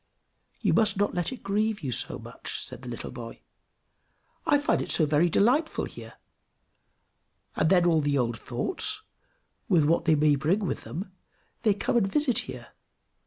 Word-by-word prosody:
"You - - +2
must 215 -3 +3
not 205 +1 +1
let 175 +5 -1
it 260 - -8
grieve 210 +1 0
you 130 - -2
so - - +1
much," - - -7
said - - -7
the 125 - -8
little 120 - -6
boy. 115 -1 -9 1.1
"I 295 -3 +5
find 290 - +1
it - - -5
so 160 - +4
very 155 +4 +3
delightful 260 - +2
here, - - -11 1.4
and 160 - +2
then 180 -2 +4
all 165 -3 +4
the 145 -1 +1
old 120 -3 -1
thoughts, - - -2 0.7
with 160 -4 +4
what 165 +3 +2
they 160 -2 +4
may 150 0 +4
bring 165 +10 +1
with 195 - -3
them, 185 +4 -6 0.5
they 215 -4 +3
come 210 - 0
and 195 -4 +1
visit 285 -5 +1
here." - - -7
175 Hz, 170 wpm, -27 LUFS, 150-215 Hz, 1.4 s, I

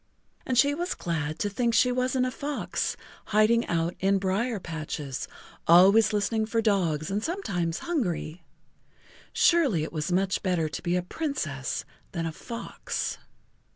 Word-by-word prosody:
And 255 - 0
she 280 +4 +5
was 350 +5 -2
glad 155 -3 -2
to - - -1
think 235 +3 0
she 250 +2 +4
wasn't 255 +1 +1
a 255 - -1
fox, 285 +2 -2 0.3
hiding 215 +2 +3
out 170 0 0
in 195 +1 +3
brier 200 +4 0
patches, 155 -5 -5 0.4
always 195 +7 +7
listening 215 +1 0
for 230 +1 0
dogs 180 -8 +1
and 205 +2 -1
sometimes 175 - -2
hungry. 180 - -2 0.9
Surely 280 - +3
it 155 - -6
was 155 +2 -2
much 190 +2 +1
better 180 -4 +1
to 150 - -5
be 175 0 0
a 180 - 0
Princess 180 - -3 0.3
than 165 -2 -2
a 165 - -2
fox. 235 +8 -5
195 Hz, 150 wpm, -27 LUFS, 165-240 Hz, 0.9 s, always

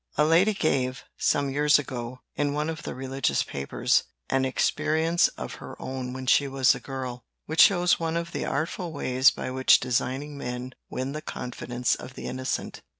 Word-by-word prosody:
A 150 - +5
lady 180 +7 +4
gave, 130 -6 0 0.2
some 140 -1 +2
years 145 +2 +4
ago, 125 -3 -5
in 145 -1 0
one 150 +2 -1
of 160 -1 -7
the - - -6
religious 135 0 0
papers, 70 -1 +1 0.3
an 135 0 +2
experience 160 +5 +2
of - - -6
her - - -9
own 130 -1 -4
when 130 0 -6
she 140 +3 +4
was 135 -2 +4
a - - -6
girl, 130 -2 -6 0.2
which 160 +1 +3
shows 180 -2 +5
one 165 0 -1
of 170 0 -3
the - - -3
artful 165 +4 -2
ways 130 -1 +4
by 130 - -5
which 130 0 +5
designing 130 +3 -2
men 125 0 -5 0.2
win 130 +1 -3
the 155 +2 -5
confidence 125 -2 -2
of 125 - -7
the - - -7
innocent. 130 0 -3
135 Hz, 180 wpm, -26 LUFS, 130-155 Hz, 0.3 s, A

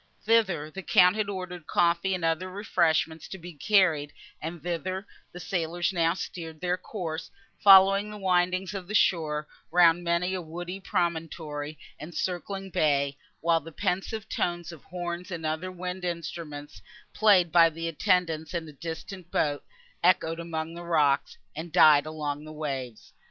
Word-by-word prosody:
Thither, 190 -9 +2
the 195 - -6
Count 180 0 +5
had 215 -2 -1
ordered 185 -4 -6
coffee 175 +2 +2
and 175 -2 -3
other 165 +3 0
refreshment 165 -5 +1
to 190 - -6
be 175 0 -10
carried, 160 -3 +2 0.3
and 165 +1 -6
thither 185 +3 -3 0.3
the 180 - -9
sailors 175 0 -1
now 165 -1 +2
steered 165 -3 -7
their 180 +1 0
course, 175 -4 -5 0.3
following 195 +1 +7
the 210 - -8
windings 185 0 +1
of 190 -3 -6
the 210 - -3
shore 155 -6 +2 0.2
round 175 0 +5
many 170 +2 0
a 185 - -2
woody 175 +3 -6
promontory 160 -4 -3 0.2
and 165 +3 -9
circling 190 +1 -3
bay; 140 -3 +1 0.3
while 165 0 +3
the 165 +1 -11
pensive 200 +5 -2
tones 175 -3 -2
of 165 -4 -12
horns 175 0 -5
and 170 -3 -5
other 160 +4 -2
wind 180 0 -5
instruments, 160 - -5 0.3
played 195 -6 +4
by 165 -1 +7
the 165 +1 -5
attendants 165 -1 0
in 165 -2 -3
a 150 - -11
distant 170 +4 -7
boat, 145 -4 0 0.4
echoed 165 -2 +3
among 165 -1 -4
the 170 +1 -8
rocks, 150 -5 +1 0.2
and 160 +2 -6
died 155 -3 +6
along 150 -2 -4
the 155 - -9
waves. 135 -7 -5
170 Hz, 155 wpm, -27 LUFS, 160-185 Hz, 0.4 s, following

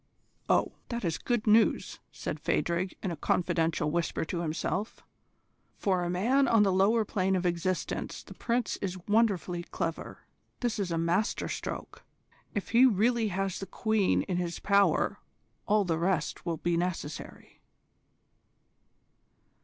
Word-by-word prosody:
O." - - +3 0.2
"That 235 -4 -3
is 165 -1 -1
good 240 -3 -1
news," 220 +1 +3
said - - -5
Phadrig, 175 +2 -1
in 190 - -1
a - - -3
confidential 165 -1 0
whisper 170 0 -1
to 170 - -3
himself; 175 +6 -3 0.7
"for 185 -3 +1
a 175 - -2
man 245 +10 +2
on 225 -3 +5
the 195 - +3
lower 215 +4 +3
plane 190 -2 0
of 185 -1 -1
existence 175 +1 -2
the - - -11
Prince 235 -1 -1
is 185 -2 -3
wonderfully 205 -5 +2
clever. 165 -1 -5 0.4
This 240 -3 -1
is 195 -3 -1
a 165 - -1
master 175 +6 0
stroke. - - -6 0.5
If 205 - -2
he 235 +2 +5
really 230 +1 +2
has 195 -1 -2
the 195 - -6
Queen 220 0 +1
in 180 -3 -2
his 175 -1 -2
power 200 0 +2 0.5
all 210 -1 +3
the 165 -2 0
rest 175 -1 -1
will 165 -1 -1
be 175 +2 -1
easy." 170 -4 -3
190 Hz, 145 wpm, -29 LUFS, 170-215 Hz, 0.7 s, on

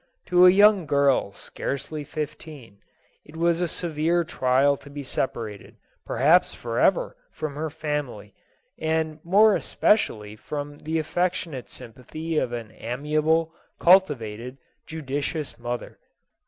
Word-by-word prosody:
To 180 0 +7
a - - +10
young 200 -2 +5
girl 140 -7 +2
scarcely 145 +7 -5
fifteen, 150 -6 -7
JOSEPHINE. - - -41 0.4
it 150 - -15
was 170 +1 +1
a 175 - +1
severe 170 +1 0
trial 135 -2 +2
to 140 - -14
be 140 0 -7
separated, 115 -6 -4 0.3
perhaps - - +3
forever, - - +1 0.2
from 155 -2 -5
her 155 +2 -3
family, 145 -9 -4 0.5
and 160 0 -1
more 205 +5 +5
especially 105 - +1
from 145 +5 -6
the 160 +1 -2
affec 175 +3 0
tionate 140 -10 -7
sympathy 150 +7 -5
of 120 - -2
an 115 -3 -6
amiable, 155 +6 0 0.2
cultivated, 125 - +2 0.3
judicious 150 0 -4
mother. 120 0 -5
150 Hz, 125 wpm, -25 LUFS, 130-165 Hz, 0.5 s, a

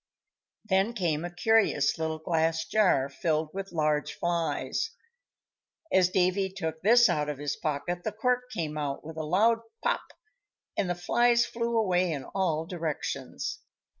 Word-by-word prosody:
Then 195 +2 +2
came 170 -7 -1
a 175 - -3
curious 180 -6 +2
little 160 0 -1
glass 160 0 0
jar, 185 -11 +3
filled 155 +2 -1
with 195 0 -5
large 150 -2 0
flies. 170 - -1 1.0
As 185 -1 +4
Davy 185 +1 +2
took 160 -4 -5
this 235 +4 +6
out 150 0 0
of 145 - -3
his 145 0 -2
pocket, 165 +4 -3
the 215 - -2
cork 250 +3 0
came 155 -9 -3
out 140 -2 -3
with 160 0 -8
a 160 - -2
loud 215 +9 +3 0.2
"pop!" - - +1 0.7
and 185 - 0
the 175 - 0
flies 235 +7 +3
flew 235 0 -2
away 185 -5 +2
in 140 -4 -3
all 165 -2 -1
directions. 165 -4 -4
175 Hz, 150 wpm, -28 LUFS, 155-205 Hz, 1.0 s, this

